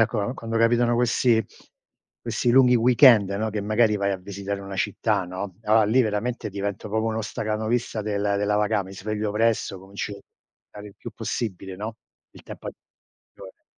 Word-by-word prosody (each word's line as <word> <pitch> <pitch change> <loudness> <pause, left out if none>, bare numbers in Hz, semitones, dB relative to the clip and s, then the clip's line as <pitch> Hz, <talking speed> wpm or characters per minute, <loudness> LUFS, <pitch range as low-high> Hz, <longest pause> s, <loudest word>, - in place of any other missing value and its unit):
calcola, 115 0 +1
quando 115 -2 -4
capitano 120 +1 +3
questi 120 -1 +2 0.8
questi 120 - -1
lunghi 125 0 +6
weekend, 120 -3 +6
no, 110 +2 -2
che 105 - -3
magari 110 +1 +2
vai 100 0 0
a - - -2
visitare 100 +1 -5
una 95 0 -7
città, 95 - 0
no, 95 +1 -6
allora 110 +1 +4
lì 110 +5 +3
veramente 110 +1 -1
divento 100 +1 -4
proprio 110 +2 0
uno 110 0 -2
stacanovista 110 +1 -2
del 100 -1 -2 0.2
della 105 +1 +1
vaca 105 0 +1
mi 95 - -11
sveglio 105 +2 -3
presto, 110 -2 0
comincio 100 +2 -6
a - - -14 0.5
stare 105 0 -11
il 100 - -17
più - - -8
possibile, 95 -4 -4
no, 110 +3 -6 0.3
il - - -16
tempo - - -9
a - - -3
disposizione. - - -18
105 Hz, 175 wpm, -24 LUFS, 100-115 Hz, 0.8 s, lunghi